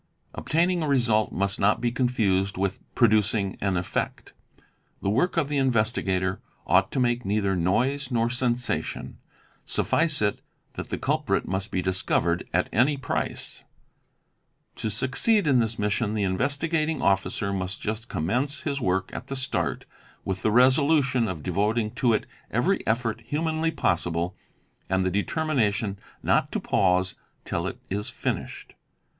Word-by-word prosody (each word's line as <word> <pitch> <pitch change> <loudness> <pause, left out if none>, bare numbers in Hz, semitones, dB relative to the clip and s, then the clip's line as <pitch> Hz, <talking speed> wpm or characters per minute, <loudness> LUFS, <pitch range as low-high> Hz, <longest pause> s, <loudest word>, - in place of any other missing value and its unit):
"Obtaining 170 +2 +1
a 155 - -1
result' 120 -6 +2
must 100 +1 -1
not 100 +2 +3
be 120 0 0
confused 105 -7 +1
with 95 0 -1 0.2
'producing 110 -3 +3
an 95 -2 +1
effect." 85 - -3 0.7
The 100 - +1
work 150 - +1
of 160 -4 +2
the 145 -1 0
investigator 105 -7 +1 0.2
ought 95 +3 +3
to 135 - 0
make 120 -1 +1
neither 100 -1 +1
noise 125 +10 +1
nor 115 -2 +1
sensation: 125 -1 -1 0.4
suffice 160 -3 +1
it 105 -1 0 0.3
that - - -6
the - - -2
culprit - - 0
must 95 +3 -2
be 90 - -1
discovered 90 -2 0
at - - +1
any 135 +6 +3
price. 135 - -4 1.2
To 110 - -2
succeed 135 - +2
in 135 -5 +4
his 115 0 -2
mission 105 +1 0
the 105 - 0
Investigating 145 - 0
Officer 100 +1 +1
must 95 0 -3
just 110 +2 -4
conimence 125 - -1
his 140 -1 -2
work 95 -2 0
at 125 - -6
the 135 - -4
start 90 - -1 0.4
with 95 -1 -2
the - - +2
resolution 130 +1 +4
of 85 -6 -5
devoting 105 +4 0
to 120 -3 +4
it 110 - 0 0.2
every - - +1
effort 115 0 0
humanly 160 +2 0
possible 85 - 0 0.5
and 95 0 +1
the 95 - +1
determination 110 - 0 0.2
not - - +2
to - - 0
pause 90 0 +2 0.3
till - - -2
it - - -5
is 105 +2 -2
finished. - - -4
110 Hz, 145 wpm, -26 LUFS, 95-130 Hz, 1.2 s, in